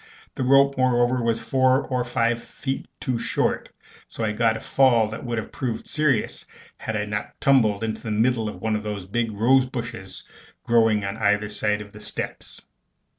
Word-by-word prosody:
The - - -5
rope, 140 +1 +4
moreover, 125 0 +3
was 115 -1 +1
four 130 0 +2
or 125 -2 -1
five 115 -1 0
feet 135 +2 -5
too 125 -3 -2
short; - - -1 0.4
so - - -6
I 110 - +1
got 115 +1 +1
a - - -7
fall 120 -5 +3
that 110 - -7
would 120 -2 -3
have 110 - -4
proved 120 -4 -4
serious 150 -8 0 0.3
had 110 - -4
I 105 -1 -1
not 105 0 -5
tumbled 115 -7 +3
into 110 -1 -3
the 115 - -5
middle 110 +1 +1
of - - -10
one 110 -1 +1
of 105 - -2
the 105 -1 -4
big 115 0 0
rose 130 +5 +3
bushes 115 -7 -6 0.4
growing 115 -4 +3
on 100 - -4
either 105 0 +1
side 105 0 -1
of 105 -1 -10
the - - -12
steps. - - -6
115 Hz, 185 wpm, -24 LUFS, 105-130 Hz, 0.4 s, rope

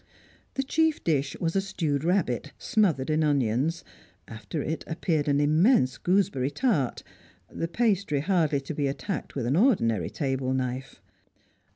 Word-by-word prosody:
The 270 - 0
chief 320 +3 +1
dish 140 -3 0
was 165 0 -1
a 195 - +3
stewed 160 -7 -2
rabbit, 150 - 0
smothered 170 - +1
in 155 +1 +2
onions; 140 +2 +1 0.4
after 110 +7 -5
it 160 +1 -3
appeared 160 -2 -1
an 145 0 +2
immense 150 - +3
gooseberry 175 -9 +1
tart, 155 - 0 0.5
the 165 - -3
pastry 195 -7 +1
hardly 160 -5 +1
to 135 +3 -6
be 145 -1 -1
attacked 180 +8 -4
with 130 -4 -2
an 130 +4 +1
ordinary 160 - +2
table 130 -3 -1
knife. 130 0 -4
150 Hz, 145 wpm, -27 LUFS, 135-185 Hz, 0.5 s, a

